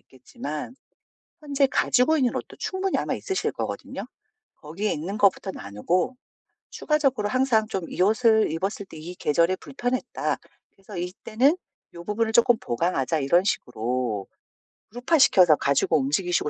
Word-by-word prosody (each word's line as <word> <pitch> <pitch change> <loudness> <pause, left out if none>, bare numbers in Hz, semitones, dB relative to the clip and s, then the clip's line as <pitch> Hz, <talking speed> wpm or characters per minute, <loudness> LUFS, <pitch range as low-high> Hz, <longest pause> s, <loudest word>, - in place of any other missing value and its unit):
있겠지만 145 - -8 0.7
현재 285 -2 +1
가지고 265 +3 +2
있는 255 -4 +1
옷도 - - -6
충분히 380 0 -2
아마 - - -1
있으실 385 - -2
거거든요. - - -5 0.5
'거기에 175 +8 -3
있는 185 +8 -4
것부터 200 -1 +2
나누고 170 - -2 0.6
추가적으로 270 -9 0
항상 245 -3 +2
좀 190 -4 -3
"이 - - -3
옷을 220 0 +4
입었을 195 +5 -3
때 - - -12
이 170 +4 -8
계절에 170 +3 +2
불편했다. 250 +2 -3 0.3
그래서 195 0 -12
이때는 215 - +1 0.4
요 170 - -8
부분을 220 +4 -1
쪼끔 235 0 +5
보강하자." 155 +3 -1
이런 160 +6 +3
식으로 120 - -2 0.6
그룹화시켜서 245 - +4
가지고 140 +3 +2
움직이시고 150 +4 0
195 Hz, 340 characters per minute, -25 LUFS, 155-245 Hz, 0.7 s, 쪼끔